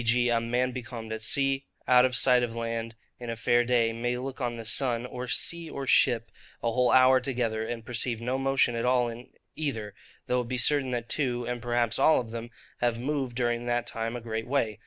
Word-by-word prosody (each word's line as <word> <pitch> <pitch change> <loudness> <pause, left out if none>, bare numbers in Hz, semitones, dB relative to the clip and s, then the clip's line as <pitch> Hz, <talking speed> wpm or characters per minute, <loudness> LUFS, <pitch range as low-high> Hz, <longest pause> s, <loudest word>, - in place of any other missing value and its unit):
g. 120 +1 +3
a 115 -1 +2
man 125 +2 0
becalmed 120 -3 -6
at 110 - -5
sea, 135 +4 +1 0.2
out 125 0 +6
of 130 -1 0
sight 125 0 +5
of 120 -1 -2
land, 115 0 -4 0.2
in 120 -1 -7
a 115 - -2
fair 120 +1 +2
day, 120 -2 +2
may 120 +2 -2
look 135 +2 -6
on 120 -1 -1
the 115 -1 -8
sun, 120 +1 0
or 125 0 -6
sea, 170 +6 0
or 140 -2 -5
ship, 115 -3 +3 0.3
a 115 - +1
whole 125 +1 +2
hour 130 0 +6
together, 120 -4 -1
and 115 0 -5
perceive 120 -1 -2
no 125 +3 -2
motion 135 -2 +2
at 115 0 -2
all 125 -1 +3
in 120 +2 -8 0.3
either; 115 -10 -3 0.3
though 125 0 +1
it 120 - -7
be 130 +1 -2
certain 135 +2 +2
that 120 -2 -3
two, 125 -3 -1
and 120 0 -4
perhaps 120 -1 0
all 160 - +5
of 115 -3 -6
them, 115 0 -6 0.3
have 120 -1 +1
moved 135 -2 -2
during 120 -1 -1
that 120 0 0
time 115 0 -4
a 120 - -5
great 110 0 -4
way. 120 -6 0
120 Hz, 220 wpm, -28 LUFS, 115-125 Hz, 0.3 s, out